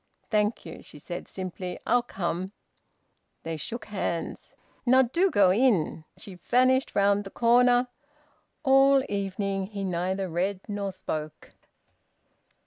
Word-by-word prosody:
"Thank 210 +1 +1
you," 165 - -9
she - - -13
said 175 +4 -7
simply. 185 -1 -6
"I'll 245 - +3
come." 190 -3 -4 0.9
They 165 0 -4
shook 220 - -6
hands. 190 -5 -4 0.3
"Now 260 +1 +5
do 340 +11 +1
go 200 - +4
in!" 190 -8 +1
She 195 - -10
vanished 255 +8 +2
round 200 0 +3
the 195 - -8
corner. 245 +3 +4 0.8
All 270 0 +5
the 260 - -6
evening 195 -1 -2
he 200 -1 -6
neither 185 +1 -1
read 185 +3 -1
nor 200 -2 -3
spoke. 155 -4 -6
200 Hz, 130 wpm, -27 LUFS, 185-245 Hz, 0.9 s, Now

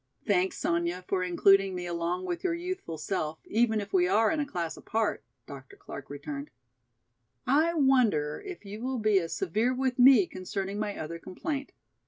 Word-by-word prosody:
"Thanks, 190 -3 +1
Sonya, 170 +2 -1
for 190 - 0
including 195 +2 +4
me 180 -1 -4
along 175 +1 -2
with 175 -1 -3
your 345 -2 +1
youthful 355 - -5
self, 155 -3 -2
even 220 -1 +2
if 200 -1 -7
we 180 -2 +4
are 215 +7 +3
in 320 - 0
a 290 - -1
class 170 - -3
apart," 220 -1 -1 0.2
Dr. 135 -2 -11
Clark 140 - -10
returned. 145 0 -6 1.0
"I 310 +6 +3
wonder 250 - +2
if 370 - -8
you 205 +2 -7
will 260 +1 -2
be 215 -3 +3
as 165 -2 -5
severe 215 +8 0
with 260 0 -1
me 250 -5 +8
concerning 195 +2 -5
my 210 -1 -3
other 165 +2 -5
complaint. 280 - -5
195 Hz, 175 wpm, -29 LUFS, 175-250 Hz, 1.0 s, me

